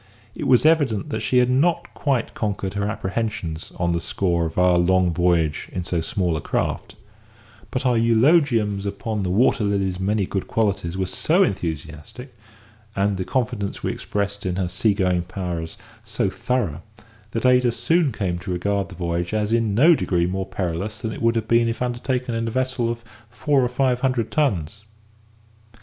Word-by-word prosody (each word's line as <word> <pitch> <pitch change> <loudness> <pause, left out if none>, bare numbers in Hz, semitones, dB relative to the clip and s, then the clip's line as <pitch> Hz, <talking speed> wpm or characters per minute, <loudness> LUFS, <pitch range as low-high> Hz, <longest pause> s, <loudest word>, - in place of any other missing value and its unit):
It - - -4
was 125 +2 +4
evident 145 -11 +3
that 110 - -2
she 120 +4 +1
had 125 0 +4
not 160 +7 +1
quite 135 -6 -1
conquered 100 -3 -3
her 100 0 -1
apprehensions 95 -6 -3
on 85 -1 0
the 85 - 0
score 85 -1 0
of 80 - -9
our 90 -1 +4
long 90 0 +3
voyage 85 -3 +1
in 90 - -3
so 85 -2 -1
small 85 +1 -1
a 75 - -3
craft; - - -2 0.7
but 130 0 -3
our 125 -1 +3
eulogiums 115 - +3
upon 105 +1 -3
the 95 - -1
Water 115 +5 +3
Lily's 100 -2 0
many 100 +1 0
good 95 +1 -3
qualities 100 -5 -1
were 95 - 0
so 165 - +2
enthusiastic, 85 - -5 0.6
and 100 0 +1
the 95 - -2
confidence 115 -4 -2
we - - 0
expressed 100 0 -3
in 90 -1 -2
her 95 -1 -1
sea 100 +4 +1
going 90 -2 +1
powers 85 -2 -5 0.3
so - - -1
thorough, 100 - -2 0.5
that 115 +3 -3
Ada 125 -1 +4
soon 145 +6 +1
came 95 -6 -2
to 85 - -8
regard 100 +2 -1
the - - -10
voyage 85 +3 -2
as 105 +1 0
in 115 -3 +1
no 155 +9 +7
degree 90 - +1
more 95 +1 -2
perilous 95 +4 -3
than 110 -1 -4
it - - -8
would 115 0 +2
have 110 -1 -1
been 115 0 +3
if 115 - -3
undertaken 125 0 -2
in 115 0 -1
a - - 0
vessel 130 0 -1
of 115 0 -4 0.3
four 140 +3 +1
or 125 - +1
five 125 0 +1
hundred 125 -4 0
tons. 105 - 0
105 Hz, 180 wpm, -22 LUFS, 90-120 Hz, 0.7 s, no